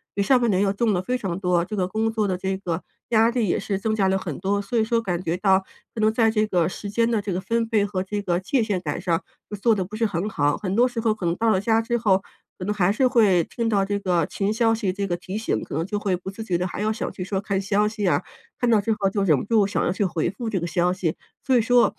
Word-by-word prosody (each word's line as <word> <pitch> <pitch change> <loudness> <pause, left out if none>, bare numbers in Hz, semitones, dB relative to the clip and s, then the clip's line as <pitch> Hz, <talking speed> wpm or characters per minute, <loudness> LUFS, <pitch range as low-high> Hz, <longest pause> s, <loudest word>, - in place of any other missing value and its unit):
比 200 - +1
上 255 +4 +4
半 235 - +2
年 190 0 +2
要 195 -1 +1
重 220 +2 +1
得 180 - +1
非 250 +5 -1
常 190 -7 -3
多， 180 -2 +2
这 210 +4 -5
个 185 -3 0
工 220 +3 -1
作 215 -2 0
的 185 - 0
这 190 +1 -2
个 175 -3 -3 0.3
压 225 0 +4
力 235 -3 0
也 - - +1
是 195 -1 -2
增 215 +2 -1
加 200 -3 +2
了 190 - +2
很 180 -7 -5
多， 200 +2 0
所 205 +4 -3
以 220 - +3
说 230 +1 +1
感 180 -5 -2
觉 170 0 -1
到 190 -1 +4 0.3
可 220 - -4
能 215 0 +4
在 225 0 +3
这 215 -1 +2
个 175 -5 +2
时 200 +2 -6
间 230 +3 +1
的 220 -3 +1
这 200 - -4
个 180 - -1
分 230 +4 -1
配 210 -3 +2
和 200 -2 -2
这 205 +2 -3
个 175 -2 0
界 240 +7 0
限 200 -4 -1
感 175 - -3
上 170 -3 0 0.3
就 210 - -4
做 225 +3 +3
得 190 -3 -1
不 205 +4 -9
是 225 +1 +1
很 195 0 -2
好， 145 -6 +1
很 195 -2 -3
多 245 +3 +5
时 245 -2 -4
候 225 -1 +2
可 210 -4 -6
能 170 0 +1
到 225 +3 +1
了 190 -3 +2
家 225 +1 +2
之 235 +1 -1
后， 195 -4 +3 0.4
可 185 - -6
能 210 - 0
还 195 -2 +2
是 255 +5 +3
会 205 -9 +4
听 230 +4 -3
到 200 -3 +2
这 200 0 -1
个 175 -4 +1
群 200 +5 -2
消 225 0 +2
息 215 -4 -1
这 200 +1 -3
个 175 - -1
提 190 +3 -6
醒， 220 - -1
可 - - -9
能 160 +2 -1
就 205 +2 -3
会 195 -3 0
不 185 +2 -7
自 220 +3 -7
觉 180 -5 0
地 180 - -1
还 185 - -5
要 215 - +1
想 220 - -3
去 185 - -5
说 190 +1 -2
看 195 -1 -1
消 205 +1 +1
息 215 -2 -3
啊， 180 - +2 0.4
看 245 - +1
到 220 -3 +4
之 225 - -1
后 195 - +2
就 200 0 -1
忍 155 -7 +4
不 - - -3
住 215 -2 +3
想 205 - -1
要 - - +1
去 190 +3 -1
回 175 -4 0
复 230 +1 -5
这 195 -4 -1
个 170 - -3
消 175 +1 +1
息。 180 -3 -1 0.3
所 260 - +3
以 240 - +5
说， 245 +2 +3
200 Hz, 335 characters per minute, -24 LUFS, 185-220 Hz, 0.4 s, 多